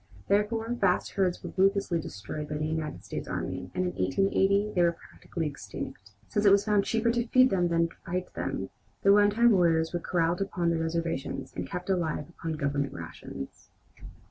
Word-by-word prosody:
Therefore 215 +3 +1
vast 195 -6 +1
herds 185 -3 0
were - - -6
ruthlessly 195 -3 +2
destroyed 145 +7 -6
by 150 - -2
the 155 - -1
United 155 -1 -3
States - - -5
army, - - -4
and - - +1
by 95 - -13
1880 195 - +2
they 180 - +2
were 170 -1 +4
practically 165 0 -6
extinct. 100 -8 -6 0.2
Since 205 - 0
it 200 - +7
was 200 0 +5
found 210 -2 +3
cheaper 230 +1 +2
to 235 0 -1
feed 255 +2 +5
than 175 -2 +2
to 165 0 +1
fight 180 0 -3
them, - - -3 0.3
the 200 - +7
one 205 0 +6
time 235 +3 +4
warriors 165 -4 +3
were 175 - 0
corralled 170 +1 0
upon 175 -4 0
their 165 - 0
reservations 165 -3 -2
and - - -4
kept 180 0 -5
alive 165 -6 0
upon 165 -1 -5
Government 140 -2 -1
rations. 75 -4 -8
175 Hz, 185 wpm, -28 LUFS, 160-200 Hz, 0.3 s, it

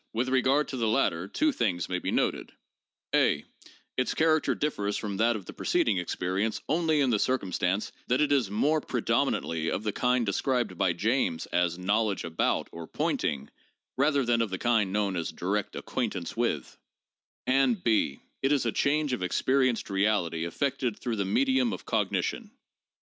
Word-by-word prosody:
"With 120 +3 0
regard 135 +3 +2
to 130 - -4
the 115 -2 0
latter 95 -5 +1
two 310 - +1
things 95 - -1
may 90 -1 -2
be - - -3
noted: - - -1 0.6
(a) - - +3 0.5
Its 130 - 0
character 160 -1 +2
differs 105 -9 -1
from 100 -3 -4
that 115 +3 +3
of 100 -4 -6
the - - -9
preceding 95 - +1
ex 90 - -3
perience 95 +4 -1
only 160 -1 +2
in 130 -3 +2
the 105 - +2
circumstance 100 -5 0 0.2
that 125 - +2
it 150 - +2
is 130 -8 +2
more 145 +10 +1
predominantly 80 - 0
of 105 - -2
the 105 - 0
kind 125 +2 +1
described 120 0 0
by 85 0 +1
James 110 -2 0
as 90 -1 +1
'knowledge 100 +2 0
about' 85 0 0
or 85 -1 -8
'pointing,' 70 -1 -2 0.4
rather 140 -1 +2
than 120 -1 +2
of 115 - 0
the 95 - -3
kind 110 -3 +1
known 100 -1 0
as 85 -2 -2
direct 100 +3 -2
'acquaintance - - -3
with'; - - -2 0.7
and 130 -7 +2
(b) 110 -11 +1 0.2
It 135 - +2
is 140 -4 +2
'a 115 - +1
change 145 +1 +1
of 110 - -2
experienced 130 +5 +1
reality 95 -5 +1
effected 130 +4 -1
through 120 -3 -3
the 100 - 0
medium 260 - +2
of - - -7
cognition' 240 - -1
(p. 210 - -21
110 Hz, 175 wpm, -28 LUFS, 95-135 Hz, 0.7 s, a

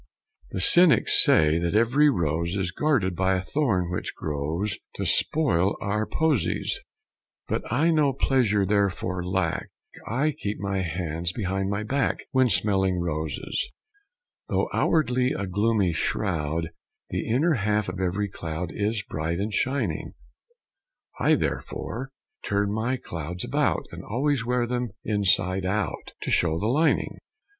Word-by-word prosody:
The - - -4
cynics 175 - +7
say 80 +1 +4
that 85 +3 -1
every 130 +7 +4
rose 85 - 0
Is 95 -3 -1
guarded 105 - +1
by 95 +1 +2
a 90 - -1
thorn 95 - 0
which 90 - -4
grows 80 +7 -3 0.2
To - - -3
spoil 100 - +2
our 105 +2 -1
posies; 155 -7 0 0.7
But - - -3
I 155 +7 +3
no 150 -3 +3
pleasure 120 -7 +2
therefore 95 -2 0
lack; 95 +1 -1 0.4
I 135 +8 +1
keep 110 -8 -4
my 100 -1 -1
hands 85 -1 -3
behind 95 -1 -2
my 100 +1 -2
back 135 +5 -1
When 130 -2 +3
smelling 95 -2 +1
roses. 80 -4 -3 0.8
Though - - 0
outwardly 130 -5 +2
a 100 - -3
gloomy 100 -1 +1
shroud 80 -3 -1 0.4
The - - -3
inner 150 +9 +3
half 105 -3 0
of 90 +1 -5
every 95 +3 0
cloud 85 -2 -5
Is 105 +1 -1
bright 80 +2 -2
and 105 +3 -3
shining: 135 +6 -1 1.1
I - - +4
therefore 130 +3 -4 0.3
turn 100 0 0
my 115 +5 -1
clouds 85 -4 -6
about, - - 0
And - - -8
always 135 +3 0
wear 125 0 0
them 125 -1 -3
inside 95 -2 +1
out 95 -1 -2
To - - -3
show 80 -2 +2
the 100 - -2
lining. 155 +6 +1
100 Hz, 140 wpm, -25 LUFS, 90-125 Hz, 1.1 s, cynics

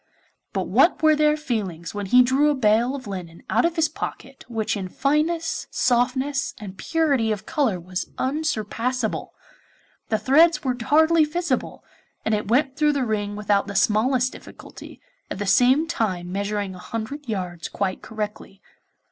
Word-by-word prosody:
But - - -2
what - - +3
were 310 -1 +6
their 300 0 +3
feelings 200 - -4
when 205 -1 -4
he 250 +5 +6
drew 270 +4 +3
a 295 - +2
bale 235 +2 +2
of 265 -2 -8
linen 180 -4 -7
out - - +3
of 335 0 0
his 320 -2 +3
pocket 275 -2 -7
which 225 -3 -2
in 190 -2 -4
fineness, 310 - 0
softness, 260 +3 0
and 200 -3 -9
purity 280 -6 +1
of 215 0 -3
colour 240 -11 0
was 180 +2 -5
unsurpassable! 255 -4 -2 0.7
The 220 - +2
threads 300 +8 +4
were 255 -2 0
hardly 315 +6 +4
visible, 345 +3 -2 0.4
and 220 - +1
it 210 -1 -1
went 265 +4 +2
through 300 0 +3
the 275 -3 0
ring 205 -2 -2
without 205 -1 +1
the 200 - -6
smallest 250 +6 +2
difficulty, - - -12 0.3
at - - -5
the 205 - -3
same 255 - +4
time 190 - -2
measuring 200 0 -2
a 185 - -11
hundred 230 +8 -6
yards 180 -5 -4
quite 190 -2 -2
correctly. 210 -2 -6
240 Hz, 160 wpm, -23 LUFS, 205-290 Hz, 0.7 s, were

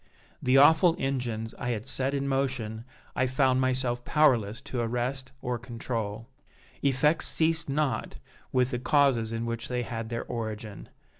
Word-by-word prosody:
The 130 +1 +4
awful 160 +4 +6
engines 120 -5 -2
I 125 - -3
had 110 -2 -2
set 135 +1 0
in 140 0 -1
motion 130 -5 -1 0.3
I 130 - +2
found 130 0 +2
myself 125 -2 0
powerless 120 -9 +2
to 125 - -5
arrest 125 +3 -2
or 125 -1 -2
control. 115 -2 -4 0.5
Effects 140 +4 +2
ceased 165 -1 +1
not 145 -1 -1 0.3
with 125 0 +2
the 125 - -2
causes 130 -4 +2
in 115 0 -2
which 115 0 -4
they 125 -1 -2
had 115 -1 -5
their 115 0 -3
origin. 110 -3 -6
125 Hz, 150 wpm, -28 LUFS, 115-135 Hz, 0.5 s, awful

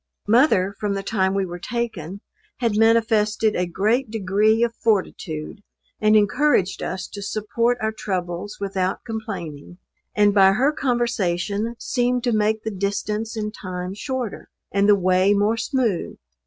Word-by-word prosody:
Mother, 210 -5 +4
from 205 -1 -1
the 195 - -3
time 190 -2 0
we 195 -1 +1
were 175 -1 -7
taken, 200 -5 -4 0.4
had 235 -4 0
manifested 220 -1 +3
a 180 - 0
great 215 +8 0
degree 215 +2 +2
of 235 -1 0
fortitude, 190 -4 -2 0.4
and 215 0 +4
encouraged 210 -1 +2
us 185 0 -4
to 205 - -8
support 225 +4 0
our 220 0 0
troubles 185 -2 -4
without 190 -2 -2
complaining; 180 -9 -6 0.4
and 205 -1 +4
by 195 -1 +6
her 265 +8 +2
conversation 230 - -1
seemed 245 0 0
to 245 - +1
make 215 0 +1
the 220 - -3
distance 210 +3 -2
and 210 -1 -3
time 180 -2 -5
shorter, 245 +2 -5 0.2
and 200 +1 +2
the 205 - +7
way 185 +1 +3
more 205 +3 +2
smooth. 230 -4 -1
210 Hz, 145 wpm, -22 LUFS, 190-225 Hz, 0.4 s, the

